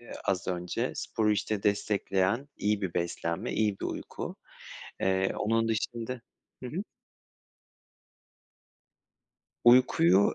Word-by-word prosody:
eee, 120 - -11
az 95 -1 0
önce. 90 -1 -2
Sporu, 110 -1 0
işte, 105 0 -1
destekleyen 100 +3 +1
iyi 105 0 0
bir 90 -3 -2
beslenme, 85 -1 -2
iyi 105 -2 +1
bir - - -3
uyku. - - -5 0.6
Eee, 95 0 +2
onun 115 +2 +1
da - - +3
şimdi 115 +2 -3 0.4
Hı 125 - -4
hı. 180 +10 -3 2.8
Uykuyu 100 -6 +6
105 Hz, 110 wpm, -29 LUFS, 95-115 Hz, 2.8 s, Uykuyu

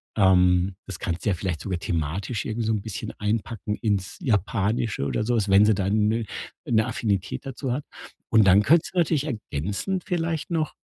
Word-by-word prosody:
Ähm, 90 -2 +4
das 95 - -7
kannst 85 0 -3
du - - +3
ja - - +3
vielleicht 90 -3 -3
sogar 90 -3 -3
thematisch 85 - -2
irgendwie 110 0 -2
so 110 - +2
'n 105 - -1
bisschen 110 -1 -5
einpacken 105 0 -2
ins 100 -4 -1
Japanische 110 - 0
oder 105 - -1
so 120 +2 +1
was, 105 -3 0
wenn 100 +2 +6
sie 110 - +5
dann 100 +2 +1
'ne 115 +1 0 0.4
'ne 110 -2 +2
Affinität 105 -2 -2
dazu 135 0 -4
hat. 135 +4 -2 0.5
Und 110 -2 +6
dann 95 +2 +6
könntest 155 - +3
du 180 - +1
natürlich 155 -4 +2
ergänzend 110 - -3
vielleicht 165 -2 -2
noch 160 -2 0
105 Hz, 190 wpm, -25 LUFS, 95-120 Hz, 0.5 s, wenn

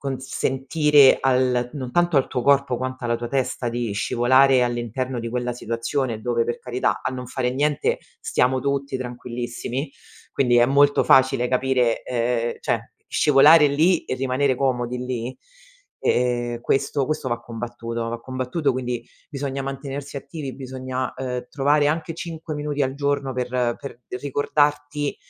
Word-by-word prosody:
consentire 135 +2 +3
al 125 -2 +2
non 130 -4 -5
tanto 175 -1 +2
al 135 - +3
tuo 125 - -2
corpo, 140 -2 +3
quanto 130 0 -5
alla 120 0 +1
tua 120 0 -5
testa, 130 -1 -1
di 120 -2 -2
scivolare 130 +5 +4
all'interno 120 +1 -2
di 115 0 -4
quella 125 +1 -2
situazione 115 0 -2
dove 115 0 0
per 120 - -3
carità, 125 0 -1
a - - -1
non 125 -1 -6
fare 125 0 -1
niente 145 +3 0 0.2
stiamo 130 +1 +1
tutti 140 0 -1
tranquillissimi, 125 +2 -5 0.4
quindi 125 -3 +2
è 120 - +5
molto 145 +1 +4
facile 130 -2 +4
capire, 125 -2 +1
ehm, 120 -1 -1
cioè, - - -2 0.2
scivolare 150 +2 +6
lì 160 +5 +2
e - - -2
rimanere 130 +1 +1
comodi 125 -2 -1
lì. 125 0 -4 0.6
E, - - +2 0.4
ehm, 120 - -7
questo 135 +2 0
questo 155 -3 -2
va 120 -1 -2
combattuto, 115 0 -5
va 120 0 -4
combattuto 130 +4 -1
quindi 125 -2 -3 0.2
bisogna 140 -2 -4
mantenersi 135 +1 -6
attivi, 140 -2 -6
bisogna, 130 -1 -4
ehm, 125 -1 -4
trovare 145 +1 +2
anche 160 +1 -2
5 165 -1 -6
minuti 145 -1 -2
al 135 0 -1
giorno 140 -1 -1
per 125 -1 -2 0.3
per 125 -3 -9 0.2
ricordarti 145 +1 0
130 Hz, 150 wpm, -23 LUFS, 125-140 Hz, 0.6 s, scivolare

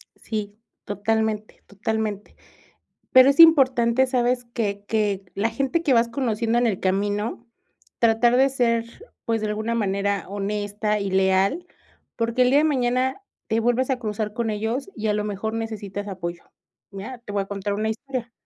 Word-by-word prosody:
Sí, 210 -2 -5 0.3
totalmente, 215 +1 -2
totalmente. 210 0 -3 0.8
Pero, 260 +1 +8
es 280 - +1
importante, 260 -6 +6
¿sabes?, 245 -1 0
que 205 -4 -2
que 205 -3 0
la 215 +3 +1
gente 275 +8 -1
que 285 -6 +3
vas 230 0 +4
conociendo 235 -3 0
en 240 0 +3
el 200 -5 -1
camino, 205 +4 -1 0.5
tratar 235 +1 +4
de 270 +1 +5
ser, 235 -3 +1 0.4
pues, 225 -1 0
de 215 - -1
alguna 220 +2 -2
manera 200 -3 -1
honesta 205 +1 -2
y 200 -1 -3
leal, 190 - +2 0.5
porque, 230 +2 0
el 250 - +3
día 280 +2 +5
de - - +2
mañana 260 +2 0 0.3
te 225 0 +1
vuelves 245 +3 +1
a 260 -2 0
cruzar 210 -2 -3
con 230 -1 -2
ellos 225 - -2
y 220 -1 -3
a 210 - +2
lo 210 0 -1
mejor 210 +1 -3
necesitas 205 -3 -5
apoyo, 175 -3 -5 0.5
¿ya? 205 +6 -7
Te 235 -3 -10
voy 200 -1 0
a - - -11
contar 200 0 -3
una 215 +2 -1
historia. 240 +1 -5
220 Hz, 165 wpm, -23 LUFS, 205-245 Hz, 0.8 s, Pero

